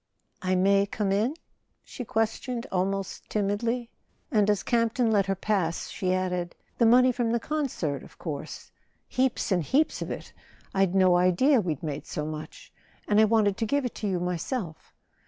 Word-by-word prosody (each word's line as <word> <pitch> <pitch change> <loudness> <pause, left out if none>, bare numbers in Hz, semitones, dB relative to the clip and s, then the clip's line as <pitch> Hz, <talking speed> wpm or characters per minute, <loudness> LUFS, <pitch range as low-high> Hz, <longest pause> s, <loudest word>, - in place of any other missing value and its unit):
"I 185 0 +1
may 195 +2 +3
come 200 -1 -1
in?" 220 +9 +1 0.5
she 250 - -7
questioned, 230 +2 -2
almost 195 +1 -2
timidly; 230 +4 -1 0.4
and 210 -4 +3
as 205 -2 +1
Campton 230 0 +1
let 200 -3 +3
her 195 - +1
pass 190 -4 -1
she 185 -2 -2
added: 180 -1 -1 0.2
"The 235 - +5
money 255 +2 +6
from 240 -1 -1
the 235 - +1
concert, 240 - -2
of - - -15
course—heaps 175 - -4
and 180 -2 +3
heaps 280 - +1
of - - -4
it! - - -7 0.4
I'd 195 -1 +2
no 185 -2 +5
idea 200 +9 +4
we'd 160 -6 -3
made 150 -1 -4
so 150 - -3
much. 155 0 -8 0.3
And 210 0 +4
I - - +7
wanted 210 -3 +2
to 225 - 0
give 285 +3 +1
it 245 - -3
to 210 - -1
you 185 -3 0
myself." 180 - -4
200 Hz, 170 wpm, -27 LUFS, 180-235 Hz, 0.5 s, I